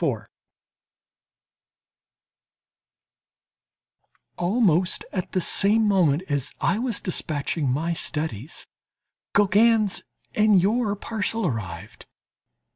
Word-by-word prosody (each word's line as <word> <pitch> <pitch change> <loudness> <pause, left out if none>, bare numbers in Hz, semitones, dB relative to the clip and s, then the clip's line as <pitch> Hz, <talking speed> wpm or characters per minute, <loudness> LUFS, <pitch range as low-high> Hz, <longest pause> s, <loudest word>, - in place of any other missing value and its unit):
Almost 185 -2 +1
at 185 -3 -4
the 185 - +2
same 210 +5 +3
moment 180 -5 +2
as 145 -2 -2
I 200 +6 +1
was 240 -3 -2
dispatching 150 -4 -2
my 160 +7 0
studies, 150 - -4 0.7
Gauguin's 205 +1 +3 0.3
and 210 -2 +4
your 210 +2 +1
parcel 220 +1 -3
arrived. 105 - -5
185 Hz, 75 wpm, -24 LUFS, 150-210 Hz, 0.7 s, and